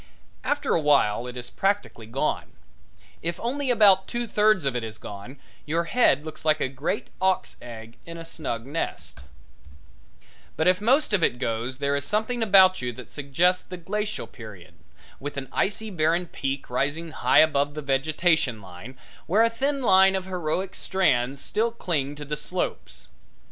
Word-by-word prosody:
After 290 Hz, 0 st, 0 dB
a 165 Hz, -, +2 dB
while 130 Hz, -6 st, +3 dB
it 125 Hz, 0 st, -7 dB
is 125 Hz, -, -6 dB
practically 195 Hz, -, -1 dB
gone. 125 Hz, +5 st, -2 dB, 0.7 s
If 170 Hz, +1 st, -3 dB
only 265 Hz, +3 st, -2 dB
about 200 Hz, -5 st, +5 dB
two 240 Hz, 0 st, -3 dB
thirds 215 Hz, -6 st, +3 dB
of 135 Hz, -2 st, 0 dB
it 120 Hz, -, -2 dB
is 110 Hz, -1 st, -6 dB
gone 105 Hz, +8 st, -9 dB, 0.3 s
your 165 Hz, +3 st, 0 dB
head 165 Hz, -, +3 dB
looks 155 Hz, 0 st, -8 dB
like 155 Hz, -1 st, +3 dB
a 130 Hz, -, 0 dB
great 140 Hz, +10 st, -3 dB
auk's 190 Hz, 0 st, 0 dB
egg 115 Hz, -1 st, -10 dB
in 170 Hz, 0 st, -7 dB
a 165 Hz, -, -8 dB
snug 120 Hz, -8 st, -5 dB
nest; 145 Hz, -, -4 dB, 1.4 s
but 160 Hz, -, +1 dB
if 185 Hz, +1 st, +3 dB
most 255 Hz, +3 st, +3 dB
of 200 Hz, -, +3 dB
it 125 Hz, -, +2 dB
goes 120 Hz, +1 st, -3 dB
there 140 Hz, 0 st, 0 dB
is 140 Hz, -, -1 dB
something 220 Hz, -, -1 dB
about 190 Hz, -5 st, +6 dB
you 125 Hz, 0 st, -2 dB
that 125 Hz, +1 st, -11 dB
suggests 170 Hz, +6 st, +1 dB
the 180 Hz, -, -8 dB
Glacial 210 Hz, +5 st, -3 dB
Period, 95 Hz, -7 st, -12 dB, 0.5 s
with 145 Hz, +1 st, -6 dB
an 135 Hz, -1 st, -4 dB
icy 210 Hz, +2 st, -1 dB
barren 170 Hz, +1 st, +1 dB
peak 135 Hz, -5 st, -4 dB
rising 150 Hz, +6 st, -1 dB
high -, -, +2 dB
above 145 Hz, -2 st, +4 dB
the 150 Hz, -, -4 dB
vegetation 140 Hz, -2 st, +1 dB
line, 95 Hz, +7 st, -11 dB, 0.3 s
where 205 Hz, +7 st, +4 dB
a 230 Hz, -, +3 dB
thin 275 Hz, +3 st, -1 dB
line 190 Hz, -2 st, +6 dB
of 190 Hz, -1 st, -2 dB
heroic 180 Hz, 0 st, -2 dB
strands 135 Hz, -8 st, +1 dB
still 220 Hz, +3 st, 0 dB
cling 155 Hz, -11 st, -2 dB
to 145 Hz, 0 st, -8 dB
the 150 Hz, +1 st, -3 dB
slopes. 180 Hz, +4 st, -5 dB
155 Hz, 170 wpm, -25 LUFS, 135-190 Hz, 1.4 s, about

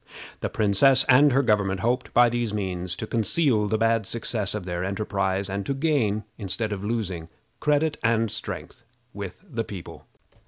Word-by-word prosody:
The -, -, -2 dB
princess 125 Hz, +6 st, +4 dB
and 140 Hz, +3 st, +6 dB
her 135 Hz, +2 st, +3 dB
government 100 Hz, -5 st, +1 dB
hoped, 125 Hz, +3 st, 0 dB
by 120 Hz, 0 st, +6 dB
these 120 Hz, -2 st, -1 dB
means, 90 Hz, -3 st, -2 dB
to 110 Hz, -, -5 dB
conceal 115 Hz, -, +1 dB
the 110 Hz, +2 st, +1 dB
bad 115 Hz, -2 st, +1 dB
success 110 Hz, -3 st, -2 dB
of 105 Hz, -4 st, -5 dB
their 90 Hz, -1 st, -3 dB
enterprise, 100 Hz, -1 st, -1 dB
and 100 Hz, 0 st, -3 dB
to 140 Hz, -, -1 dB
gain, 135 Hz, -8 st, +1 dB, 0.2 s
instead 105 Hz, +2 st, -1 dB
of 100 Hz, -1 st, -6 dB
losing, 95 Hz, -7 st, -3 dB, 0.3 s
credit 150 Hz, +1 st, +1 dB
and 115 Hz, -1 st, +2 dB
strength 110 Hz, +2 st, -6 dB, 0.3 s
with 100 Hz, -, -7 dB
the 120 Hz, -9 st, -3 dB
people. 95 Hz, -5 st, -10 dB
110 Hz, 165 wpm, -25 LUFS, 100-120 Hz, 0.3 s, and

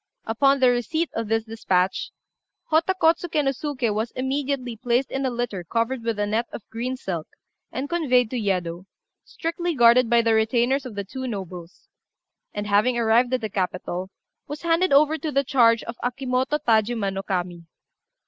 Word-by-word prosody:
Upon 275 Hz, +5 st, +3 dB
the 255 Hz, -1 st, +5 dB
receipt 310 Hz, +7 st, -1 dB
of 225 Hz, -1 st, -3 dB
this 225 Hz, +1 st, +1 dB
despatch, 195 Hz, -5 st, 0 dB, 0.6 s
Hotta 325 Hz, +4 st, +3 dB
Kôtsuké 325 Hz, -2 st, +2 dB
nô 270 Hz, -, +2 dB
Suké 255 Hz, -6 st, -2 dB
was 220 Hz, +3 st, -1 dB
immediately 265 Hz, -2 st, -2 dB
placed 245 Hz, +3 st, 0 dB
in 270 Hz, 0 st, -1 dB
a -, -, +1 dB
litter 240 Hz, -7 st, -3 dB
covered 230 Hz, +7 st, -1 dB
with 230 Hz, -2 st, -1 dB
a 205 Hz, -, 0 dB
net 220 Hz, +3 st, -1 dB
of 215 Hz, -, -9 dB
green 245 Hz, +3 st, -3 dB
silk, 170 Hz, -9 st, -4 dB, 0.4 s
and 265 Hz, +4 st, -3 dB
conveyed 255 Hz, -8 st, +2 dB
to -, -, -3 dB
Yedo, 185 Hz, -5 st, -2 dB, 0.4 s
strictly 335 Hz, +1 st, -3 dB
guarded 240 Hz, -1 st, +5 dB
by 235 Hz, -1 st, +4 dB
the 225 Hz, 0 st, +3 dB
retainers 240 Hz, +5 st, +2 dB
of 225 Hz, -, -10 dB
the 200 Hz, -, -3 dB
two 260 Hz, +6 st, -6 dB
nobles; 185 Hz, -5 st, -7 dB, 0.6 s
and, 205 Hz, 0 st, -4 dB
having 210 Hz, +4 st, +2 dB
arrived 235 Hz, +2 st, +3 dB
at 250 Hz, -, -3 dB
the 220 Hz, -, -3 dB
capital, 185 Hz, -1 st, -3 dB, 0.4 s
was 295 Hz, +1 st, -7 dB
handed 335 Hz, +2 st, +2 dB
over 305 Hz, +3 st, +4 dB
to 315 Hz, -, -3 dB
the 275 Hz, 0 st, +2 dB
charge 235 Hz, -4 st, +4 dB
of 235 Hz, +1 st, -7 dB
Akimoto 255 Hz, +2 st, 0 dB
Tajima 220 Hz, -5 st, +1 dB
no 195 Hz, -, -3 dB
Kami. 180 Hz, -3 st, -3 dB
240 Hz, 175 wpm, -24 LUFS, 210-270 Hz, 0.6 s, the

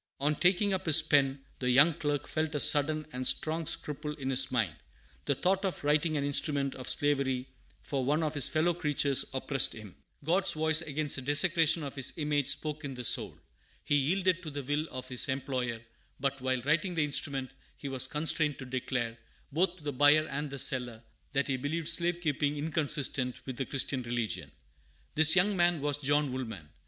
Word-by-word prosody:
"] -, -, -52 dB
On 145 Hz, +2 st, +2 dB
taking 185 Hz, +5 st, +2 dB
up 190 Hz, -1 st, -3 dB
his 160 Hz, 0 st, +7 dB
pen, 140 Hz, -3 st, +2 dB, 0.2 s
the 125 Hz, -, -1 dB
young 145 Hz, +7 st, +6 dB
clerk 145 Hz, -2 st, -3 dB
felt 155 Hz, 0 st, -2 dB
a -, -, 0 dB
sudden 155 Hz, +2 st, +4 dB
and 125 Hz, 0 st, 0 dB
strong 160 Hz, 0 st, +1 dB
scruple 150 Hz, 0 st, -4 dB
in 135 Hz, -3 st, -4 dB
his 135 Hz, 0 st, +3 dB
mind. 110 Hz, -10 st, 0 dB, 0.5 s
The 140 Hz, -, +1 dB
thought 190 Hz, +6 st, 0 dB
of 190 Hz, -6 st, -3 dB
writing 150 Hz, +2 st, +1 dB
an 140 Hz, -, -1 dB
instrument 140 Hz, -1 st, +1 dB
of 130 Hz, -, -6 dB
slavery 135 Hz, -3 st, 0 dB, 0.4 s
for 135 Hz, -2 st, -2 dB
one 150 Hz, +5 st, +1 dB
of 155 Hz, -1 st, -2 dB
his 145 Hz, -4 st, +2 dB
fellow 160 Hz, +2 st, +1 dB
creatures 145 Hz, -4 st, +1 dB
oppressed 135 Hz, 0 st, +1 dB
him. 105 Hz, -4 st, -11 dB, 0.3 s
God's 180 Hz, +2 st, +4 dB
voice 160 Hz, 0 st, +1 dB
against 150 Hz, -2 st, -2 dB
the -, -, -4 dB
desecration 160 Hz, +3 st, +2 dB
of 140 Hz, -, -6 dB
His 135 Hz, -3 st, -1 dB
image 150 Hz, -3 st, 0 dB
spoke 155 Hz, 0 st, +1 dB
in 135 Hz, -2 st, -6 dB
the 125 Hz, -, -6 dB
soul. -, -, 0 dB, 0.5 s
He -, -, -1 dB
yielded 180 Hz, +6 st, +1 dB
to 160 Hz, -, -6 dB
the 145 Hz, -1 st, -6 dB
will 145 Hz, +4 st, -1 dB
of 130 Hz, 0 st, -7 dB
his 125 Hz, -1 st, -2 dB
employer, 130 Hz, -3 st, -2 dB, 0.4 s
but, 135 Hz, 0 st, -2 dB
while 130 Hz, -1 st, -1 dB
writing 155 Hz, +7 st, 0 dB
the 155 Hz, -2 st, +2 dB
instrument, 140 Hz, -2 st, -2 dB, 0.3 s
he 140 Hz, -, -7 dB
was 135 Hz, -2 st, 0 dB
constrained 150 Hz, -1 st, 0 dB
to 130 Hz, -, -8 dB
declare, 125 Hz, -2 st, -3 dB, 0.3 s
both 175 Hz, +4 st, +1 dB
to 160 Hz, -, -17 dB
the 145 Hz, -1 st, -3 dB
buyer 145 Hz, +3 st, +5 dB
and 145 Hz, +2 st, -4 dB
the 140 Hz, -, -6 dB
seller, 125 Hz, -4 st, -2 dB, 0.3 s
that 140 Hz, 0 st, 0 dB
he 135 Hz, -2 st, 0 dB
believed 155 Hz, +5 st, -3 dB
slave 170 Hz, +1 st, -1 dB
keeping 145 Hz, -2 st, -1 dB
inconsistent 145 Hz, -4 st, -1 dB
with 130 Hz, -, -5 dB
the 135 Hz, -, -3 dB
Christian 135 Hz, -1 st, -2 dB
religion. 120 Hz, -2 st, -3 dB, 0.6 s
This 160 Hz, +1 st, +8 dB
young 195 Hz, +2 st, +3 dB
man 175 Hz, -2 st, +2 dB
was 145 Hz, 0 st, -1 dB
John 145 Hz, 0 st, 0 dB
Woolman. 110 Hz, -11 st, -6 dB
145 Hz, 195 wpm, -30 LUFS, 135-155 Hz, 0.6 s, This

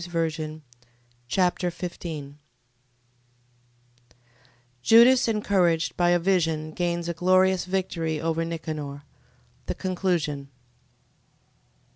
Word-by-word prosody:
2 175 Hz, -, -8 dB
Machabees 160 Hz, -2 st, -3 dB, 0.7 s
Chapter 180 Hz, +4 st, +1 dB
15 160 Hz, -5 st, -7 dB, 2.4 s
Judas 235 Hz, -, +6 dB
encouraged 190 Hz, -7 st, +1 dB
by 175 Hz, -1 st, +2 dB
a 175 Hz, -, +4 dB
vision 165 Hz, -4 st, 0 dB
gains 170 Hz, 0 st, -2 dB
a 170 Hz, -, -1 dB
glorious 185 Hz, +2 st, +3 dB
victory 170 Hz, -4 st, -2 dB
over 165 Hz, +1 st, -1 dB
Nicanor. 155 Hz, -4 st, -5 dB, 0.6 s
The -, -, -2 dB
conclusion. 170 Hz, -7 st, -2 dB
170 Hz, 85 wpm, -25 LUFS, 155-185 Hz, 2.4 s, Judas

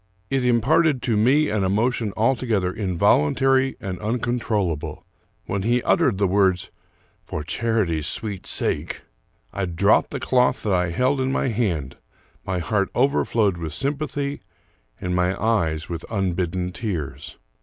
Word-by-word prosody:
It 135 Hz, -1 st, +1 dB
imparted 130 Hz, +4 st, +3 dB
to 115 Hz, -, +1 dB
me 135 Hz, +8 st, +3 dB
an 105 Hz, -2 st, 0 dB
emotion 110 Hz, +3 st, 0 dB
altogether 110 Hz, -6 st, +1 dB
involuntary 110 Hz, -, +2 dB
and 95 Hz, -6 st, -5 dB
uncontrollable. 105 Hz, -, -2 dB, 0.4 s
When 100 Hz, -, -2 dB
he 120 Hz, +4 st, +1 dB
uttered 110 Hz, -7 st, +2 dB
the 100 Hz, -, +2 dB
words, 95 Hz, -2 st, +1 dB, 0.3 s
" -, -, -38 dB
for 75 Hz, -, -4 dB
charity's 90 Hz, -4 st, 0 dB
sweet 105 Hz, -4 st, 0 dB
sake," -, -, -1 dB, 0.5 s
I 100 Hz, -, -1 dB
dropped 90 Hz, +4 st, +2 dB
the -, -, -4 dB
cloth 125 Hz, -1 st, +2 dB
that 105 Hz, -, 0 dB
I 90 Hz, -1 st, +1 dB
held 130 Hz, +9 st, +1 dB
in 130 Hz, 0 st, 0 dB
my 135 Hz, -, 0 dB
hand; 90 Hz, -, -2 dB, 0.5 s
my 95 Hz, -1 st, -2 dB
heart 100 Hz, +4 st, 0 dB
over 135 Hz, +3 st, +3 dB
flowed 105 Hz, -6 st, +1 dB
with 80 Hz, -3 st, -5 dB
sympathy 140 Hz, 0 st, -2 dB, 0.6 s
and 90 Hz, 0 st, -2 dB
my 90 Hz, +1 st, 0 dB
eyes 80 Hz, -9 st, 0 dB
with 85 Hz, -2 st, -5 dB
unbidden 90 Hz, -3 st, -1 dB
tears. 90 Hz, -, -5 dB
105 Hz, 145 wpm, -23 LUFS, 90-125 Hz, 0.6 s, imparted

